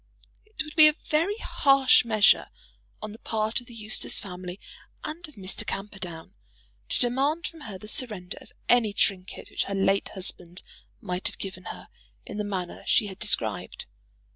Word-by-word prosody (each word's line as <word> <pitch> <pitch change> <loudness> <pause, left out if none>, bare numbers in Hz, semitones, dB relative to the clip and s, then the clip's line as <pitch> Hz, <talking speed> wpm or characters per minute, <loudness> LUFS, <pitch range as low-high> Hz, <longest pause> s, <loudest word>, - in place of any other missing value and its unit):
It 425 -7 -5
would 305 - -10
be 310 -2 +10
a 305 - +4
very 335 +7 +2
harsh 275 - +5
measure, 215 -3 +5 0.6
on 215 - -4
the 220 - -11
part 220 +1 0
of 245 - -17
the 235 - -11
Eustace 215 -1 -2
family 180 -1 -7 0.4
and 335 +2 -5
of 300 - -17
Mr. 190 -2 -2
Camperdown, 195 -3 -5 0.6
to - - +2
demand 275 +7 +2
from 330 - -6
her 195 - -6
the 210 - -11
surrender 210 -5 -3
of - - -15 0.2
any 230 -4 +4
trinket 190 -2 -1
which - - 0
her 200 - -3
late 195 0 +2
husband 180 -1 -1 0.4
might 180 -2 -1
have - - -4
given 185 -2 -6
her - - -7 0.4
in - - -6
the 210 - 0
manner 190 -4 -3
she - - +4
had 195 -1 -7
described. 115 - -1
210 Hz, 170 wpm, -27 LUFS, 185-255 Hz, 0.6 s, be